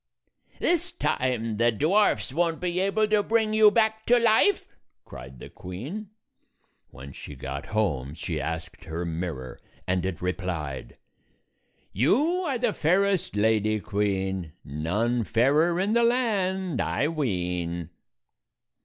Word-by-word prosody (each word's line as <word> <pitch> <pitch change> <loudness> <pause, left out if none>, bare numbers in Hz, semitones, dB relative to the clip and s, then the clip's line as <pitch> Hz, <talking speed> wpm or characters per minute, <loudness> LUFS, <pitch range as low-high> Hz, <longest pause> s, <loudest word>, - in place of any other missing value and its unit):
"This 350 +1 +1
time 125 - -1
the 120 +1 +3
dwarfs 160 - +2
won't 165 +1 0
be 180 0 -1
able 200 +3 +2
to 210 -1 +4
bring 220 0 +1
you 215 -1 +7
back 220 0 +1
to 245 - +6
life!" 215 -4 +4 0.4
cried 65 +2 -10
the - - -9
queen. 140 - -7 0.8
When 70 +2 -11
she - - -9
got 70 +2 -6
home 80 -10 -1
she 80 -3 -3
asked 80 +3 -5
her 85 +2 -4
mirror, 80 -7 -5 0.3
and 90 -1 0
it 95 -3 -3
replied, 90 -7 -4 1.0
"You 285 - +2
are 270 -4 0
the 240 -3 0
fairest, 185 - +1
Lady 110 0 +2
Queen; 95 -5 -2
None 105 - -1
fairer 150 - +2
in 200 +3 +1
the 235 - +4
land, 190 - +1
I 145 - 0
ween." 90 - -2
120 Hz, 125 wpm, -26 LUFS, -, 1.0 s, you